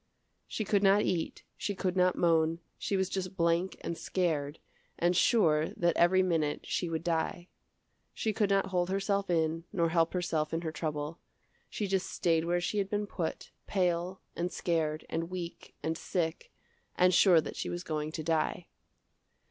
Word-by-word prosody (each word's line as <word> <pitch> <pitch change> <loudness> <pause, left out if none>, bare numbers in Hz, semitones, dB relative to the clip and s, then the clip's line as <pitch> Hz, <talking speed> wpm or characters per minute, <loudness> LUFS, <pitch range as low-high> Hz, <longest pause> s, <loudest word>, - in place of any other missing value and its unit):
She 215 - -3
could 200 0 +2
not 200 +1 +5
eat, 170 -3 -2
she 205 - -2
could 185 -1 -1
not 180 -1 +3
moan, 165 -1 +3 0.2
she 200 - 0
was 190 0 +1
just 190 0 -4
blank 170 +1 +1
and 170 - -3
scared, 160 -5 -1 0.4
and 175 +1 +2
sure 160 -8 +4
that 170 -1 +2
every 185 +2 +5
minute 160 -5 0
she 175 - -2
would 165 -1 -2
die. 170 +1 -1 0.6
She 220 - -2
could 205 -1 +1
not 195 -1 +3
hold 180 -1 +1
herself 195 0 0
in, 165 -1 +1
nor 170 -4 +1
help 165 0 +2
herself 165 -4 -1
in 165 - -1
her 160 -2 -3
trouble. 155 0 -4 0.5
She 210 - -3
just 190 -1 0
staid 165 -2 +1
where 175 +1 +1
she 205 +4 -1
had 195 -1 -1
been 205 0 -1
put, 175 -5 -4 0.2
pale, 180 -1 0
and 175 +1 -2
scared, 160 -3 -1
and 165 +1 -3
weak, 175 -2 -7
and 160 0 -1
sick, 165 -1 -3 0.4
and 180 0 +4
sure 180 -1 +6
that - - -4
she - - -3
was 175 +1 -4
going 155 -3 -3
to 160 - -4
die. 165 +2 0
175 Hz, 175 wpm, -31 LUFS, 165-185 Hz, 0.6 s, sure